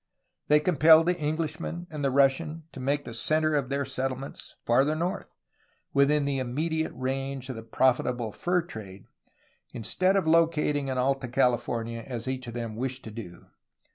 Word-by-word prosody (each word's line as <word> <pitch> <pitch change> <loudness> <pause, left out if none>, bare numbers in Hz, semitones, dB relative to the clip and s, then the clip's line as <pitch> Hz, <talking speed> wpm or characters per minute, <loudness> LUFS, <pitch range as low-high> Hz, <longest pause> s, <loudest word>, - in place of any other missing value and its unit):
They 150 0 +6
compelled 160 0 +6
the 180 0 +1
Englishman 160 +3 -3
and 150 -2 -5
the 135 - +3
Russian 140 +4 +2
to 140 - -10
make 140 +3 -1
the 115 - -7
centre 155 +6 +1
of 140 -4 0
their 140 0 -1
settle 130 -1 -2
ments 135 +1 -9
farther 135 +6 +3
north, 170 +3 -2 0.7
within 140 +1 +3
the 140 -1 0
immediate 160 +6 -1
range 135 +1 -3
of 130 - -4
the 110 - -6
profitable 120 0 +1
fur 180 - 0
trade, 100 - -10 0.7
instead 185 - +1
of 195 -4 +2
locating 160 -3 +2
in 130 -1 -2
Alta 135 +1 0
California 120 -2 0
as 120 -1 -6
each 130 -1 -3
of 120 - -7
them 115 -2 -4
wished 130 +2 -3
to 110 - -8
do. 105 -6 -9
135 Hz, 170 wpm, -27 LUFS, 125-155 Hz, 0.7 s, They